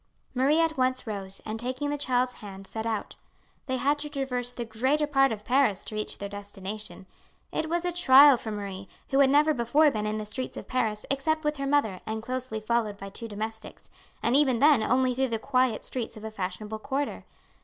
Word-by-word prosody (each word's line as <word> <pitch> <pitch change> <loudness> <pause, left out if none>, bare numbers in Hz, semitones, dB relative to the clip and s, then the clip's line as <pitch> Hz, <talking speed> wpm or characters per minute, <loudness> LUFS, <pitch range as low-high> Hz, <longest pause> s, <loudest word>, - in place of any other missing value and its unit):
Marie 275 +5 +3
at 325 -2 +1
once 255 0 +1
rose, 195 -3 -5
and 220 +1 -4
taking 255 +4 -2
the - - 0
child's 255 -2 +1
hand 195 -2 -9
set 220 +3 -3
out. 220 -2 -3 0.5
They 260 -1 0
had 285 +3 +1
to 295 0 -4
traverse 260 -4 -2
the 240 -1 -5
greater 260 +7 +1
part 270 -3 +3
of 210 -1 -5
Paris 250 -7 +2
to 215 - -6
reach 215 - -2
their 200 - -5
destination. 205 0 -6 0.5
It 315 - -2
was 345 +1 0
a 355 - +1
trial 285 -4 +8
for 230 - -6
Marie, 200 -2 -5 0.2
who 270 - +3
had 275 -1 +6
never 300 +3 +4
before 285 +5 +3
been 215 -3 -2
in 215 0 -2
the 215 - -4
streets 215 +5 -4
of - - -8
Paris 220 -4 -1
except 315 +3 0
with 300 0 0
her 275 0 -2
mother 250 -10 +1
and 220 0 -3
closely 255 -2 -4
followed 215 -2 -1
by 195 0 -8
two 230 +4 -6
domestics, 220 +1 -7 0.3
and 235 - +2
even 270 -4 +4
then 285 -1 +5
only 255 +2 +2
through 265 +2 +1
the 230 - -1
quiet 255 0 +1
streets 235 -3 -4
of 215 - -10
a 220 - -5
fashionable 210 +2 -5
quarter. 275 +4 -3
245 Hz, 210 wpm, -27 LUFS, 215-275 Hz, 0.5 s, trial